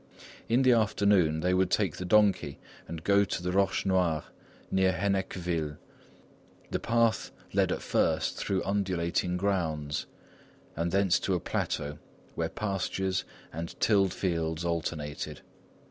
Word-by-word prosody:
In 120 +3 +4
the 130 - +6
afternoon, 100 -8 +3
they 90 +2 +2
would 95 0 +2
take 100 -7 +1
the 90 - -4
donkey 95 -8 +3 0.3
and 80 -1 -7
go 100 +1 +4
to 95 -2 -3
the 90 - -1
Roches 95 0 +1
Noires, 90 -5 +2 0.5
near 95 -1 +3
Hennequeville. 90 -5 -1 0.9
The - - 0
path 115 -1 +1 0.2
led - - +2
at - - -2
first - - +1
through 95 -1 -1
undulating 90 -3 0
grounds, 80 -6 -1 0.7
and 85 +2 -1
thence 95 -1 +3
to 95 - 0
a - - 0
plateau, 75 -2 -3 0.3
where - - -2
pastures 95 -2 -2 0.3
and 85 +2 -6
tilled 100 -4 +3
fields 85 -2 -1
alternated. 80 -3 -3
90 Hz, 130 wpm, -29 LUFS, 85-100 Hz, 0.9 s, the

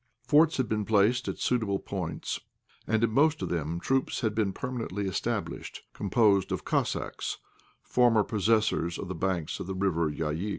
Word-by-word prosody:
Forts 160 +2 +5
had 130 -3 +1
been 105 0 0
placed 110 +4 +2
at - - -3
suitable 110 -6 0
points, 90 -4 -4 0.5
and 110 +1 +1
in 115 - +2
most 150 +5 +3
of - - -2
them 85 0 -2
troops 135 +7 0
had 110 -3 0
been 105 -2 +1
permanently 115 -4 -4
established, 95 - -3
composed 100 -1 +2
of - - -3
Cossacks, - - -1 0.5
formerly 115 -4 +3
possessors 105 -5 +1
of 90 - -6
the - - -2
banks 90 -2 -2
of - - -5
the 95 - -3
River 85 -4 +1
Yaïk. 80 +6 -2
105 Hz, 165 wpm, -28 LUFS, 95-115 Hz, 0.5 s, Forts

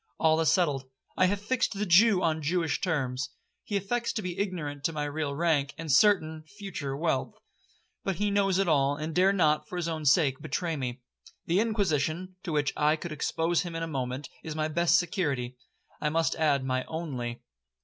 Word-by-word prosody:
'All 160 0 +4
is 160 - +3
settled—I 140 0 0
have 200 +2 0
fixed 240 +5 0
the 205 +1 -2
Jew 195 +2 +5
on 160 -1 +1
Jewish 165 +1 0
terms. 135 -7 -1 0.3
He 205 - -1
affects 235 +5 -1
to 215 - -3
be 180 -1 -4
ignorant 150 -8 -2
of 165 - -7
my 150 - -1
real 145 -1 -3
rank, 150 -3 +1
and 160 -2 -3
certain 160 -2 +3
(future) 155 -9 -5
wealth, 155 -4 -1 0.7
but 195 - -1
he 205 +4 0
knows 195 -2 +2
it 195 -1 +2
all, 140 -3 +3
and 155 +2 -4
dare 185 +3 +4
not, 155 -5 +2
for - - -6
his 175 -2 -2
own 160 -2 -3
sake, 140 -2 +3
betray 165 +4 -2
me. 130 -2 -4 0.4
The 175 +3 +2
Inquisition, 185 -5 0
to 170 - -5
which 145 -2 +1
I 150 +1 +3
could 170 +1 -7
expose 165 +2 0
him 175 -1 -6
in 165 - -2
a - - -2
moment, 130 -2 -3 0.2
is 160 -1 -5
my 155 0 0
best 170 +2 +3
security—I 145 - -3
must 165 +1 +1
add, 145 -4 +1
my 130 0 0
only. 130 -8 -5
160 Hz, 190 wpm, -28 LUFS, 145-180 Hz, 0.7 s, Jew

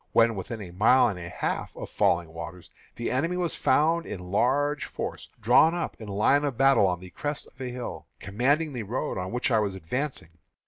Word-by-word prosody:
When 115 0 +5
within 110 +3 -6
a 90 - -9
mile 115 +7 +5
and 95 -4 -5
a 85 0 -7
half - - -3
of - - -6
Falling 85 -2 +1
Waters, 85 +2 -8 0.2
the 115 - -3
enemy 165 +8 0
was 175 -3 -1
found 165 +3 +2
in 90 -2 -7
large 145 +7 +1
force, - - -6
drawn 125 +9 +5
up 175 - -3
in 110 - -7
line 105 +8 +3
of 140 -5 -2
battle 135 -7 +5
on 90 -1 -1
the 90 0 -11
crest 145 - -4
of 130 - -16
a 130 - -3
hill, 125 -1 -6
commanding 140 +9 0
the 125 - -3
road 110 -2 -3
on 90 0 -4
which 125 +2 -1
I 110 - +4
was 100 -3 -1
advancing. 95 - -4
115 Hz, 210 wpm, -27 LUFS, 95-140 Hz, 0.2 s, When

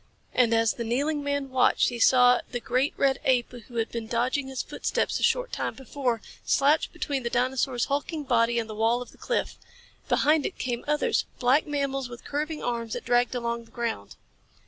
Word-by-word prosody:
And 245 -2 +3
as 225 -1 +3
the 235 - -4
kneeling 285 +6 -1
man 285 -1 -2
watched 255 -1 +3
he 240 -1 -6
saw 250 +1 +6
the 245 - -2
great 255 +4 0
red 270 -1 +2
ape 250 -2 +2
who 240 0 -12
had 225 -1 0
been 230 -1 -4
dodging 250 +4 0
his 265 -1 -3
footsteps - - -1
a - - -7
short - - +1
time - - -3
before, 255 -3 -2 0.2
slouch 285 +3 +2
between 280 -2 -3
the 240 - -2
dinosaur's 250 0 0
hulking 290 +2 -2
body 235 -3 +2
and 230 -1 -1
the 215 - -7
wall 225 +3 +1
of - - -17
the - - -21
cliff. - - -2 0.5
Behind 305 0 +3
it 370 - -4
came 240 -2 -3
others 300 +1 +1
black 255 +5 +3
mammals 275 -3 -2
with 240 0 -11
curving 300 +2 -3
arms 235 -2 -2
that - - -5
dragged 245 +1 +2
along 235 -1 -2
the - - -22
ground. 230 - -4
250 Hz, 195 wpm, -27 LUFS, 235-280 Hz, 0.5 s, saw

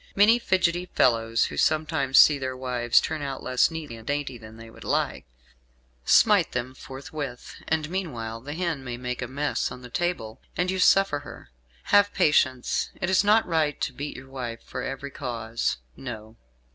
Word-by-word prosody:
Many 215 +4 +6
fidgetty 180 -4 +1
fellows, 115 -6 +2
who - - -6
sometimes 155 -4 +1
see 150 -2 +8
their 130 -1 -4
wives 125 -2 +2
turn 155 -1 -3
out 135 -2 -5
less 125 -1 +3
neat 160 -4 -6
and 115 -1 -9
dainty 145 -2 -2
than 110 0 -12
they 115 0 -11
would 115 - -13
like, - - -1 0.8
smite 210 -7 +5
them 125 +1 -3
forthwith; 135 -1 -7
and 155 -1 0
meanwhile 120 -11 -4
the 145 +4 -7
hen 165 -5 -2
may 125 -2 -5
make 125 0 -4
a 120 - -3
mess 140 +2 -1
on 125 0 -9
the 125 - -11
table, 125 -12 -2 0.2
and 180 +1 +1
you 190 - -2
suffer 195 -5 +4
her. 145 - -12 0.4
Have 205 0 +5
patience; 135 -7 +2
it 190 -1 -1
is 190 - +4
not 215 +2 +4
right 155 -4 0
to - - -1
beat 145 +1 -6
your 135 0 -12
wife 120 -3 -6
for 125 - -6
every 135 +2 -5
cause, 115 -5 -3 0.2
no!" 110 -4 -8
135 Hz, 180 wpm, -26 LUFS, 125-165 Hz, 0.8 s, see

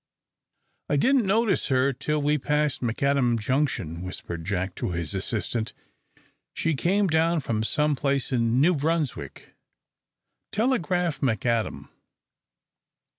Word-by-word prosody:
"I 145 - +2
didn't 255 - +3
notice 220 +1 +2
her 130 +1 +2
till 150 +3 -2
we 150 +1 +2
passed 150 0 0
McAdam 125 0 +1
Junction," 110 - -1
whispered 90 -2 -6
Jack 95 -1 -2
to - - -2
his 85 +1 -3
assistant. 110 +3 -2 0.8
"She's 160 -2 0
come 195 +7 +2
down 165 0 +2
from 115 -4 -1
some 150 +7 +2
place 140 -1 -1
in 120 -1 +2
New 170 +6 +5
Brunswick. 145 - -2 1.0
Telegraph 180 - 0
McAdam." 115 -3 -1
140 Hz, 115 wpm, -26 LUFS, 115-160 Hz, 1.0 s, New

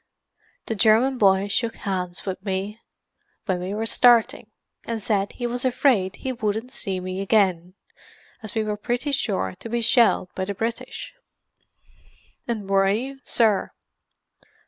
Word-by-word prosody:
The - - -2
German 230 +5 +3
boy 195 -1 +4
shook 225 +3 -1
hands 180 -3 -4
with 190 -1 -4
me 200 +2 -3 0.7
when 185 -4 0
we 185 +3 -4
were 220 +1 -2
starting, 235 -1 +3 0.3
and 230 -1 -3
said 205 -1 -1
he 245 - -5
was 245 +1 -2
afraid 250 -7 +2
he 260 - -4
wouldn't 220 +1 -2
see 190 -7 -3
me 185 +1 -4
again, 185 -4 +1 0.7
as 215 -2 -7
we 220 - +1
were 210 -1 -2
pretty 245 +6 -2
sure 195 - -1
to 230 - -8
be 235 +1 0
shelled 230 -6 +3
by 190 - -3
the 200 +1 -4
British." 230 +3 -4 1.3
"And 220 -5 -3
were 195 0 +3
you, 260 +7 -2
sir?" 220 -4 +2
215 Hz, 145 wpm, -24 LUFS, 195-235 Hz, 1.3 s, boy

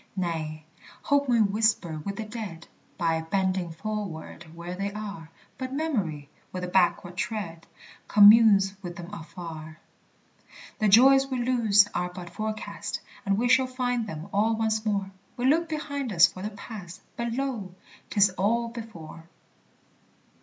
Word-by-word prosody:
Nay, 160 -4 -3 0.4
Hope 285 -1 +2
may 235 -2 +4
whisper 205 -6 +1
with 200 +6 -5
the 220 - -4
dead 210 -7 -7 0.3
By 165 -1 +1
bending 185 +1 0
forward 180 -3 -5
where 170 +1 -6
they 200 +2 -3
are; 200 -6 -7 0.3
But 260 0 -4
Memory, 200 - -2 0.2
with 185 0 -5
a - - -2
backward 180 -1 +1
tread, 170 -5 -4 0.4
Communes 205 -2 +7
with 175 -3 -7
them 175 +3 -9
afar. 160 -3 -8 1.0
The 215 - +3
joys 270 +6 +7
we 260 -1 -3
lose 220 -5 +4
are 180 0 -1
but 180 -1 -9
forecast, 215 +3 -4 0.3
And 195 0 +2
we 240 +3 +1
shall 260 +1 +4
find 245 -3 -1
them 160 -1 -7
all 220 +3 +2
once 220 -1 0
more; 200 -2 -1 0.3
We 245 - -1
look 320 +5 +3
behind 285 -5 -3
us 175 -2 +7
for 185 - -4
the 210 - -3
Past, 205 -4 -10
But 235 -1 -3
lo! 235 -8 -3 0.3
'tis 200 -2 +4
all 230 +4 +1
before! 180 -9 -9
200 Hz, 145 wpm, -27 LUFS, 175-230 Hz, 1.0 s, Communes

